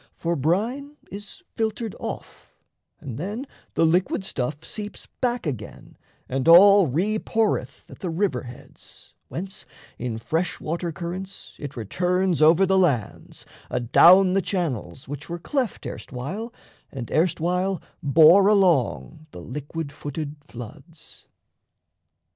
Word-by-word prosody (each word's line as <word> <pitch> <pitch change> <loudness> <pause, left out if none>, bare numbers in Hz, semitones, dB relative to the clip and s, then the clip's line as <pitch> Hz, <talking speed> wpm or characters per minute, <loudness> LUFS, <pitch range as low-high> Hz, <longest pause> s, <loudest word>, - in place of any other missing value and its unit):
For 170 0 -1
brine 230 - -1
is 205 - -10
filtered 220 -1 -2
off, - - -8 0.4
And 130 -2 -7
then 210 - -4 0.3
the 165 - +4
liquid 180 +4 +1
stuff 145 0 -4
seeps 210 -1 -7
back 245 -3 -2
again 120 -9 -6 0.3
And 130 +2 -2
all 195 +2 +8
re 190 +11 0
poureth 210 - -1
at - - -13
the 180 - -3
river 165 -7 0
heads, 125 -1 -14
Whence 190 +3 -7 0.3
in 115 -2 -3
fresh 160 +9 -2
water 170 +2 -3
currents 185 +3 -7
it 145 -2 -7
returns 180 - 0
Over 165 +5 +6
the 190 0 +3
lands, 140 - -1 0.2
adown 175 +10 +6
the 195 - +3
channels 155 - -3
which 145 +2 -7
Were 170 - -3
cleft 250 - -2
erstwhile 185 - -6 0.4
and 125 -4 -7
erstwhile 180 +3 +1 0.2
bore 160 +6 +6
along 165 - +2
The 90 - -10
liquid 145 - -6
footed 145 +1 -6
floods. 135 +7 -12
170 Hz, 125 wpm, -24 LUFS, 145-195 Hz, 0.4 s, all